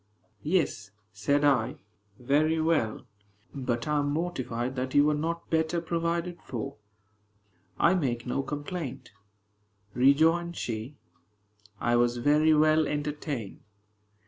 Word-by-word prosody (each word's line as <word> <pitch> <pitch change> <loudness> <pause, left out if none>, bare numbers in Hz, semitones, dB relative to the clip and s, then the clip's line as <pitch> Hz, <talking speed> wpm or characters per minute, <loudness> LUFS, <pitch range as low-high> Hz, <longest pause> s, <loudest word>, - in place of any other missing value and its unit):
"Yes," 145 - 0 0.2
said 140 +8 +1
I, 130 -6 +2 0.4
"very 150 +6 +2
well; 155 -10 0 0.5
but 125 -3 -2
I 150 0 +2
am 145 0 0
mortified 130 -6 -2
that 130 0 -3
you 145 0 +6
were 150 - +3
not 165 +3 -3
better 160 +1 +1
provided 170 +1 -2
for." 135 +3 -5 1.0
"I - - +4
make 130 -10 -1
no 130 +2 -1
complaint," 145 0 -5 0.8
rejoined 160 +7 +3
she; 115 +5 -4 0.8
"I 120 0 +2
was 120 0 +2
very 150 +5 +4
well 155 0 +4
entertained." 145 -6 -4
145 Hz, 115 wpm, -28 LUFS, 125-160 Hz, 1.0 s, you